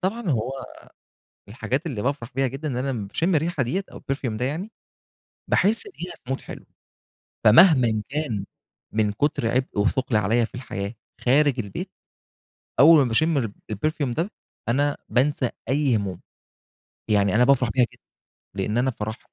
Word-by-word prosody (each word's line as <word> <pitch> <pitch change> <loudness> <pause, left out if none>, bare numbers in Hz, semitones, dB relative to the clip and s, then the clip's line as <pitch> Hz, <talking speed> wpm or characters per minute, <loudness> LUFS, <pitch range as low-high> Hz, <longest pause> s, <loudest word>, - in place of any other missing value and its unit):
طبعًا 200 +2 -2
هو 120 +1 0 1.0
الحاجات 130 - -3
اللي 115 -9 -3
بافرح 135 -3 -2
بيها 135 +1 +2
جدً، 135 +4 -6
ا - - 0
إن 125 - -3
أنا 135 +2 -1
لمّا 110 -6 -3
باشم 170 - 0
الريحة 155 -2 +1
ديّة 185 +11 -1
أو - - -9
الPerfume 130 -5 -3
ده 125 - -1
يعني، 175 - -3 0.8
باحس 220 - +2
دقيقة 180 - -8
بMood 135 - -1
حلو، - - -10 0.8
فمهمًا 120 - +6
كان 135 -9 -2 0.5
من 105 -1 +2
كتر 120 +1 0
عبء 125 -3 0
وثقل 120 +3 +1
عليَّ 110 +3 +3
في - - -12
الحياة 100 -4 -5 0.3
خارج 135 +1 +3
البيت، 100 -4 -5 0.9
أول 160 +3 +9
ما 140 - +5
باشم 160 +7 +2
الب 115 -6 -2 0.2
الPerfume 140 +3 -1
ده 170 - -1 0.4
أنا 145 +4 +2
بانسى 130 +1 +1 0.2
أي 135 -3 +2
هموم، 95 -4 -3 0.9
يعني 100 -2 +3
أنا 120 +3 +5
بافرح 125 -2 +3
بيها 125 +1 +3
جدًا - - -21 0.5
لإن 105 +3 -1
أنا 130 +2 +2
فرح 110 -2 -5
130 Hz, 160 wpm, -24 LUFS, 110-150 Hz, 1.0 s, أول